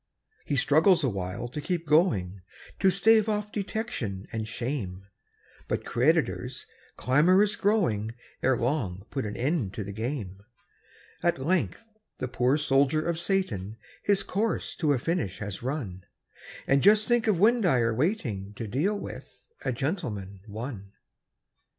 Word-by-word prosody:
He 145 - -1
struggles 160 +6 +4
awhile 100 -2 -2
to 150 +5 -5
keep 170 +1 -2
going, 110 - +2 0.4
To 195 - +5
stave 220 +3 +4
off 210 0 -1
detection 195 - -3
and 110 -1 -3
shame; 110 -6 -4 0.6
But - - -2
creditors, - - +1 0.3
clamorous 180 +10 +4
growing, 115 - +1 0.3
Ere 130 -1 +3
long 115 -8 -1
put 135 -6 -2
an 105 - -6
end 130 - -1
to 105 - -3
the 100 - -6
game. 110 -4 -4 0.8
At 175 - +2
length 140 - -1 0.3
the 130 - -3
poor 125 +3 +2
soldier 145 +1 +2
of 170 -1 -1
Satan 115 - -1 0.2
His 200 -1 +2
course 220 +4 -1
to 155 -4 +2
a 140 - +3
finish 155 - -2
has 100 -3 -6
run 120 -9 -4 0.6
And 140 0 +3
just 210 +2 +5
think 240 -2 +2
of 210 - +4
Windeyer 180 - +3
waiting 120 - -1
To 115 - -5
deal 160 - 0
with - - -9 0.2
"A - - 0
Gentleman, 115 - -3
One"! 105 -2 -7
135 Hz, 140 wpm, -28 LUFS, -, 0.8 s, To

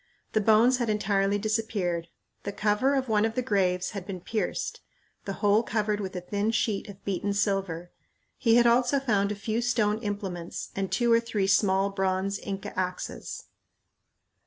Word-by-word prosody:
The 215 - +3
bones 225 +4 +5
had 240 -3 -1
entirely 200 -1 +1
disappeared. 205 -6 -1 0.3
The 200 - -4
cover 210 +7 +1
of 265 -1 0
one 215 -2 +2
of 225 0 0
the 255 - 0
graves 185 -5 +1
had 200 -3 -5
been 190 -2 -5
pierced; 215 +5 -3 0.4
the 195 - -3
hole 205 +2 +5
covered 210 -2 -1
with 190 -2 -5
a 180 - -3
thin 205 +4 -1
sheet 215 -2 0
of 200 0 -12
beaten 200 +1 -1
silver. 195 -4 -1 0.4
He 230 -3 +3
had 240 0 +6
also 245 +3 +4
found 205 -6 +1
a - - -2
few 220 +3 -2
stone 220 -3 +1
implements 200 -5 -5
and 195 -1 -2
two 240 -1 +2
or 230 - +6
three 225 -4 -1
small 195 0 +3
bronze 195 0 -1
Inca 195 -1 -5
axes. 185 0 -4
205 Hz, 170 wpm, -27 LUFS, 195-225 Hz, 0.4 s, had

